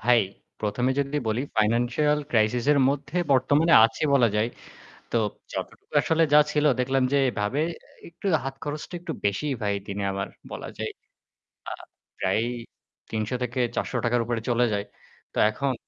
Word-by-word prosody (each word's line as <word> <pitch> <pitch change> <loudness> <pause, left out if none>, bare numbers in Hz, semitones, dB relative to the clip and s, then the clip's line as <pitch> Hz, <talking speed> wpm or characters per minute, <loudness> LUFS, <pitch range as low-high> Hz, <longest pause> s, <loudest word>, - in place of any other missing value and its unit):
ভাই, 120 +1 +5 0.4
১ম 105 +3 -1
এ - - +2
যদি 140 +1 -2
বলি 110 +3 0 0.2
financial 120 +7 +2
crisis 115 0 +2
এর 145 - +3
মধ্যে 140 +3 -2 0.2
বর্তমানে 145 +6 +3
আছি 115 - 0
বলা 120 -4 +5
যায়। 110 +2 +2 0.6
তো - - +2 0.4
যতটুকু - - -6 0.2
আসলে 165 0 +2
যা 150 - +9
ছিল 150 0 +1 0.2
দেখলাম 135 +1 +1
যে 140 - +4
এভাবে 110 +5 -1 0.4
এ - - -9
একটু 170 +4 -9 0.2
হাত 135 0 -4
খরচটা 150 +3 -5
একটু 175 -2 -5
বেশিই 105 +9 0
ভাই 100 -1 +1
দিনে 100 0 -3
আমার 100 0 -3 0.2
বলা - - -6
যায়। - - -3 0.8
আ - - -6 0.5
প্রায় 95 +4 +1 0.7
৳৩০০-৳৪০০ 120 +1 -1
র - - +2
উপরে 115 -1 -2
চলে 120 0 +3
যায়। 100 0 -1 0.5
তো - - -8
এখন 135 +5 -1
125 Hz, 155 wpm, -26 LUFS, 110-140 Hz, 0.8 s, যা